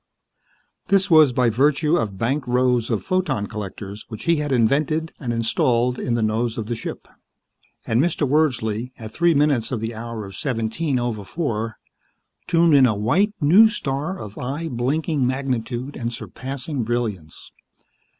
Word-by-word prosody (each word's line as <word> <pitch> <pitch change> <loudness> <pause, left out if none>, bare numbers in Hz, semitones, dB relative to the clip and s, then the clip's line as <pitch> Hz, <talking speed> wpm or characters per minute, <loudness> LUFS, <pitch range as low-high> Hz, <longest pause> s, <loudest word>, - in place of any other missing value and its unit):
This 195 -1 +3
was 155 -4 +7
by 125 -1 +2
virtue 150 +6 +2
of 105 - -1
banked 130 +6 -1
rows 125 -1 +2
of 115 -4 -1
photon 185 - 0
collectors 100 0 -7
which 110 - -8
he 170 -1 +2
had 150 -1 -2
invented 150 +7 +1
and 125 -5 -3
installed 120 +1 +1
in 120 - -1
the 115 - 0
nose 110 +2 0
of 110 - -3
the 120 +2 -3
ship. 115 - -7 0.8
And 115 +2 +2
Mr. 155 -2 0
Wordsley, 125 -5 0
at 110 -1 -9
three 170 -1 +3
minutes 140 -6 +2
of 125 - -1
the 115 +1 -4
hour 115 -1 -6
of 95 -1 -10
seventeen 130 - -1
over 120 -4 -2
four, 115 - -3 0.7
tuned 170 -1 +4
in 135 -3 +7
a 110 - 0
white, 175 - +1
new 185 +9 +6
star 150 0 -3
of 105 - -9
eye 145 +6 -3
blinking 135 +3 0
magnitude 130 0 -3
and 120 -1 -3
surpassing 135 +3 -5
brilliance. 110 -9 -4
125 Hz, 160 wpm, -22 LUFS, 115-150 Hz, 0.8 s, was